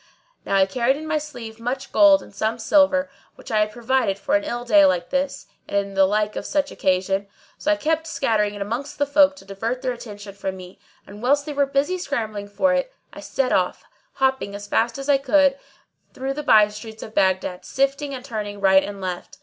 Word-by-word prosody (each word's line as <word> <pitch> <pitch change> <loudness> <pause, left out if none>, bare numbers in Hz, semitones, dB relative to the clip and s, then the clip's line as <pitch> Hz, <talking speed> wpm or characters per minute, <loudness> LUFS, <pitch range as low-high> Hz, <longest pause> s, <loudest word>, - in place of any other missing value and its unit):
Now 195 - 0
I 195 -1 +5
carried 240 +7 +1
in 310 - -7
my 310 -1 +1
sleeve 240 -7 -9
much 260 +3 -4
gold 300 -1 +6
and - - -16
some 220 +3 -1
silver, 280 +3 +3 0.3
which - - -11
I 215 - +2
had 210 0 +1
provided 240 -3 0
for 275 - -3
an 305 - +2
ill 240 -5 -4
day 205 -4 +6
like 180 -2 +2
this 275 0 -1 0.2
and 200 -1 -2
the 195 0 +5
like 210 +1 0
of - - -4
such 290 -1 -1
occasion; 195 +1 0 0.3
so 310 - +1
I - - +4
kept 320 +1 -1
scattering 215 -8 0
it 200 - -3
amongst 255 +8 -5
the 285 - +2
folk 285 0 +4
to 280 - -15
divert 225 +6 -4
their 255 - 0
attention 210 -4 -10
from 190 -1 -5
me 180 0 -12 0.3
and, 205 +1 -12
whilst 285 +4 +2
they 300 - -5
were 280 -1 +2
busy 285 +7 0
scrambling 220 - -3
for 275 +7 +1
it, 270 - -1 0.2
I - - -10
set 270 -2 -1
off, 180 -1 0 0.3
hopping 265 -6 0
as 205 0 -7
fast 230 +3 0
as 275 0 -6
I 280 -2 +4
could, 280 0 +3 0.6
through 265 +1 -3
the 300 - -4
by 215 -7 +6
streets 220 +1 -9
of 220 - -10
Baghdad, 190 -2 +1
shifting 275 +1 -1
and 255 0 -9
turning 210 -5 -5
right 190 -1 +5
and 200 -1 -7
left. 180 -1 -5
235 Hz, 215 wpm, -22 LUFS, 205-280 Hz, 0.6 s, gold